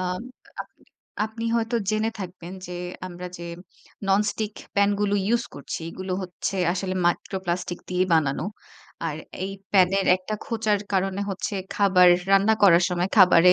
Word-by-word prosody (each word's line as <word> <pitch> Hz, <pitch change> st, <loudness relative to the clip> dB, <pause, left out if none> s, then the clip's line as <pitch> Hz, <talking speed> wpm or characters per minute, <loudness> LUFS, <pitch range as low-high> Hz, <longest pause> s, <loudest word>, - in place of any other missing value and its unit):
আ -, -, -1 dB, 0.6 s
আপনি -, -, -30 dB, 0.4 s
আপনি 225 Hz, +1 st, -7 dB
হয়তো 230 Hz, +1 st, 0 dB
জেনে 215 Hz, +1 st, +1 dB
থাকবেন 180 Hz, -1 st, -7 dB
যে 180 Hz, 0 st, -6 dB, 0.3 s
আমরা 180 Hz, 0 st, -7 dB
যে 170 Hz, -, -7 dB, 0.6 s
ননস্টিক 210 Hz, +2 st, +1 dB, 0.2 s
প্যানগুলো 200 Hz, 0 st, +2 dB
ইউজ 235 Hz, +1 st, +2 dB
করছি, 145 Hz, -, -6 dB
এগুলো 185 Hz, +1 st, -5 dB
হচ্ছে 185 Hz, +2 st, -4 dB, 0.2 s
আসলে 185 Hz, 0 st, -2 dB
micro 175 Hz, +2 st, 0 dB
plastic 175 Hz, 0 st, -2 dB
দিয়েই 185 Hz, 0 st, +1 dB
বানানো। 155 Hz, -1 st, +1 dB, 0.6 s
আর 155 Hz, -2 st, -3 dB, 0.3 s
এই 195 Hz, -, -3 dB, 0.2 s
প্যানের 195 Hz, 0 st, +4 dB
একটা 185 Hz, +3 st, -5 dB
খোঁচার 220 Hz, -4 st, +1 dB
কারণে 195 Hz, 0 st, 0 dB
হচ্ছে 195 Hz, +2 st, -3 dB, 0.2 s
খাবার 190 Hz, -3 st, +5 dB, 0.2 s
রান্না 195 Hz, +3 st, +5 dB
করার 180 Hz, -3 st, +7 dB
সময় 180 Hz, +1 st, 0 dB
খাবারে 180 Hz, -1 st, +7 dB
190 Hz, 140 wpm, -25 LUFS, 180-205 Hz, 0.6 s, করার